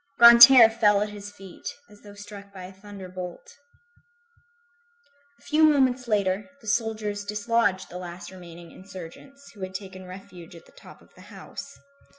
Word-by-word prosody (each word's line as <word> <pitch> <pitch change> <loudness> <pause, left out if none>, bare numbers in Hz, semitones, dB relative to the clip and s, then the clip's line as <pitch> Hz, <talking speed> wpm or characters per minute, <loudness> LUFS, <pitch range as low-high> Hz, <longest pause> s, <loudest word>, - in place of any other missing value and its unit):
Grantaire 235 +1 +10
fell 210 -3 +2
at 210 - -5
his 205 0 -10
feet, 195 -3 -13 0.2
as 210 0 -19
though 205 -1 -14
struck 205 -1 -12
by 190 -2 -11
a 185 +1 -11
thunderbolt. 195 - -10 1.8
A - - -26
few 305 +1 0
moments 260 -5 +3
later, 200 -1 -1
the 225 - -20
soldiers 215 -2 -2
dislodged 210 -2 -1
the 180 - -8
last 175 0 -9
remaining 170 -2 -13
insurgents, 190 +10 -13
who 205 - -16
had 185 0 -7
taken 190 -1 -9
refuge 180 -2 -12
at 165 - -15
the - - -21
top - - -17
of - - -26
the - - -18
house. 280 - -11
205 Hz, 160 wpm, -25 LUFS, 185-230 Hz, 1.8 s, Grantaire